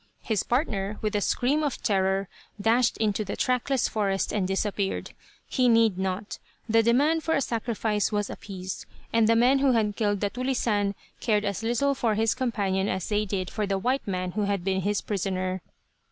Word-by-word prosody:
His 220 -3 0
partner, 210 -6 -1
with 215 0 -1
a 205 - +1
scream 270 +9 +1
of 290 -4 -1
terror, 195 -1 +1 0.3
dashed 230 +4 +2
into 215 -1 0
the 200 - -4
trackless 255 +1 +1
forest 195 -3 -1
and 195 -3 0
disappeared. 195 0 -1 0.4
He 250 -1 +2
need 225 -5 +4
not. 190 +2 -3 0.3
The 225 0 +4
demand 285 +8 +3
for 320 - +1
a - - +2
sacrifice 225 -3 -1
was 205 -1 0
appeased, 190 -2 -7 0.3
and 225 -1 +4
the 230 - +5
men 250 +4 +4
who 270 -2 +3
had 210 -3 +1
killed 205 -2 0
the 205 -1 0
"tulisane" 230 -5 0 0.2
cared 210 -2 +1
as 200 0 -2
little 240 +5 +1
for 230 -5 0
his 220 0 +2
companion 200 -7 0
as 185 -1 -2
they 210 0 +1
did 190 -2 -3
for 210 -2 -2
the 195 -1 0
white 255 +6 -1
man 185 -2 -2
who 210 +2 -1
had 200 -3 -1
been 190 0 0
his 205 +2 0
prisoner. 185 -2 -2
210 Hz, 185 wpm, -26 LUFS, 195-235 Hz, 0.4 s, the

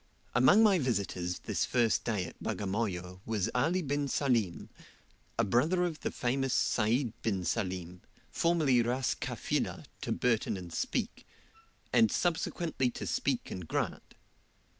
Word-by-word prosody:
Among 130 - +6
my 200 -4 +5
visitors 100 - -1
this - - 0
first 120 -3 +2
day 105 -6 -1
at - - -11
Bagamoyo 95 -3 -3
was 110 -1 -1
Ali 165 +9 +1
bin 145 0 -1
Salim, 120 - 0 0.7
a 115 - +3
brother 150 - +2
of 165 -3 -3
the - - -2
famous 130 +1 0
Sayd 115 +2 +1
bin 95 -6 -1
Salim, 90 -3 -2 0.3
formerly 155 -8 +3
Ras 120 +1 0
Kafilah - - -2 0.2
to - - -3
Burton 115 -4 +1
and 90 -2 -8
Speke, 250 -3 -2 0.7
and 225 - +5
subsequently 165 -5 0
to - - -6
Speke - - -1
and 90 -3 -6
Grant. - - -3
120 Hz, 135 wpm, -31 LUFS, 100-145 Hz, 0.7 s, Among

